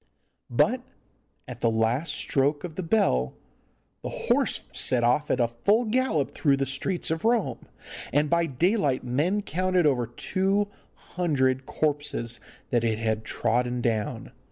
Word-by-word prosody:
But - - +2 0.7
at - - -9
the 115 - +3
last 120 +8 +1
stroke 145 +2 +1
of 175 -3 -6
the 185 - -4
bell 115 - +1 0.7
the - - -5
horse - - 0
set 125 -2 +2
off 125 +5 +2
at 130 - +1 0.2
full 220 +4 +4
gallop 220 - 0
through 140 -3 +2
the 135 - 0
streets 145 +7 -1
of 160 0 -2
Rome, 230 -1 0 0.4
and 145 +2 +2
by 170 +2 +2
daylight 150 - +1
men 155 +12 0
counted 185 -1 +1
over 125 -5 +2
two 195 - 0 0.4
hundred 135 -7 +1
corpses 145 -6 -1 0.3
that 120 -1 +2
it 110 -2 +1
had 110 -1 -1
trodden 125 +3 0
down. 110 -3 -2
145 Hz, 140 wpm, -26 LUFS, 120-180 Hz, 0.7 s, full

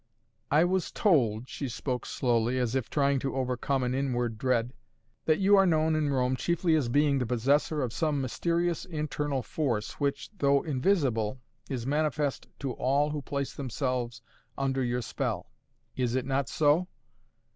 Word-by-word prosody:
"I 150 +3 +5
was 180 0 0
told," 125 - +2
she 135 -1 -5
spoke 125 +1 -3
slowly, 120 -1 +1
as 125 -2 0
if 130 -4 -1
trying 140 -2 +2
to 135 +1 -3
overcome 130 +1 0
an 125 0 0
inward 120 -4 -1
dread, 125 -1 +1 0.5
"that 155 -1 +3
you 200 +1 +5
are 195 -1 +5
known 160 -1 +2
in 155 -2 +1
Rome 130 -1 +1
chiefly 170 +4 +1
as 145 -7 +2
being 145 +1 +3
the 125 - 0
possessor 140 +5 +1
of 120 -3 -3
some 150 -3 0
mysterious 170 +6 0
internal 150 -5 -2
force 115 -7 -2
which, 140 +3 -1
though 140 -1 +3
invisible, 130 - +1 0.3
is 125 -4 -3
manifest 150 0 0
to 135 -2 -2
all 140 +5 +1
who 150 -1 -3
place 140 0 -3
themselves 125 -3 -3 0.3
under 135 -1 0
your 120 0 -1
spell! - - -3 0.4
Is 125 -1 0
it 130 -1 0
not 135 -1 0
so?" 155 +4 +3
135 Hz, 160 wpm, -29 LUFS, 125-150 Hz, 0.5 s, I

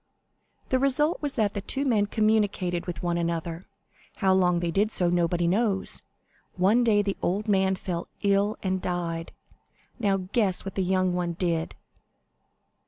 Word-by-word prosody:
"The 260 - +2
result 275 +4 +1
was 290 -2 -3
that 210 -4 +1
the 200 - -3
two 275 +8 -2
men 215 -6 +2
communicated 205 -5 0
with 175 -2 -5
one 170 -1 0
another; 170 +1 -3 0.5
how 190 -1 +2
long 180 -2 +3
they 170 -1 -1
did 205 +4 +2
so, 180 -5 +1
nobody 175 0 +1
knows. 195 +1 +1 0.5
One 205 +7 +3
day 210 -3 +3
the 200 -1 -2
old 205 +5 -1
man 190 -2 +2
fell 175 -2 -4 0.2
ill 200 +1 +2
and 190 -1 -1
died. 170 -2 -3 0.7
Now 200 -4 +2
guess 190 0 -1
what 195 - -5
the 195 - -1
young 185 0 +1
one 175 -1 -1
did?" 170 -2 -2
190 Hz, 160 wpm, -26 LUFS, 175-210 Hz, 0.7 s, long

